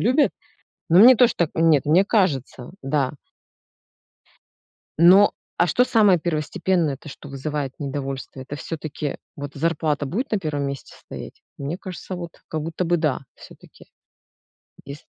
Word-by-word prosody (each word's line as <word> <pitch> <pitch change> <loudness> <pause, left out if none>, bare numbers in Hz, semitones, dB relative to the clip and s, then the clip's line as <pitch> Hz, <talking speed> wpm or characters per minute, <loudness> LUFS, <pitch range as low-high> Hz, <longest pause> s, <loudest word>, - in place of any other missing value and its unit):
любят, 260 +7 +3 0.6
но 175 - +6
мне 245 +3 +9
тоже 245 0 +5
так. 170 -3 +1
Нет, 160 -4 +3
мне 175 +6 +5
кажется. 140 - 0
Да. 135 -1 0 1.9
Но, 185 +4 +7 0.3
а 175 - +3
что 250 +9 +3
самое 210 -7 +4
первостепенное, 165 -1 -1
то, 150 - -13
что 145 - -11
вызывает 140 0 -4
недовольство- 135 -1 -5
это 135 +3 -7
всё-таки, 150 -2 -5 0.2
вот 145 0 -7
зарплата 155 -3 -1
будет 235 - -3
на 215 - +2
1 150 -5 -3
месте 140 0 -6
стоять? - - -10 0.2
Мне 145 +6 -4
кажется, 185 0 -7
вот 170 -2 -8
как 155 -1 -3
будто 165 +3 -3
бы, 175 +1 +2
да, 155 -4 0 0.2
всё-таки. - - -16 1.0
Ес 140 +2 -9
155 Hz, 140 wpm, -23 LUFS, 140-180 Hz, 1.9 s, мне